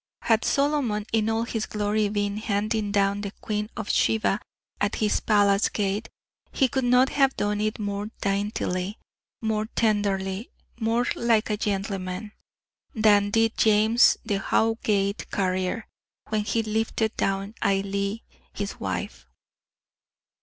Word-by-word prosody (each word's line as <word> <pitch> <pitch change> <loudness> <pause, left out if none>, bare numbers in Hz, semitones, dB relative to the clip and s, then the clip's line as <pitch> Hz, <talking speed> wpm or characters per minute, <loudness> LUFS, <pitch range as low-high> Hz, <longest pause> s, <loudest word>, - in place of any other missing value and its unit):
Had 225 -1 +3
Solomon, 275 -8 +1
in 220 -1 +2
all 225 +1 +1
his 225 -2 -3
glory, 210 0 0
been 205 0 -1
handing 215 0 -1
down 200 0 +1
the 200 - -3
Queen 210 -1 -3
of 215 -2 -4
Sheba 215 -2 +2 0.4
at 205 +1 0
his 210 -1 +1
palace 205 -1 +3
gate, 205 +1 -2 0.4
he 265 - +2
could 265 0 -1
not 250 +2 +5
have 270 -2 +2
done 205 0 0
it 215 0 -1
more 205 0 -3
daintily, 200 -1 -1 0.5
more 215 -1 0
tenderly, 205 -2 0 0.3
more 230 +2 +1
like 225 -2 +2
a - - +2
gentleman, 195 -1 -3 0.6
than 205 -2 +4
did 225 +2 +2
James 220 +2 +5
the 200 -2 0
Howgate 210 -2 0
carrier, 185 +2 -1 0.4
when 215 -1 0
he 225 +1 0
lifted 220 0 -1
down 195 +1 -1
Ailie, 200 +2 0 0.3
his 200 -1 -5
wife. 65 -10 -4
210 Hz, 130 wpm, -25 LUFS, 200-225 Hz, 0.6 s, not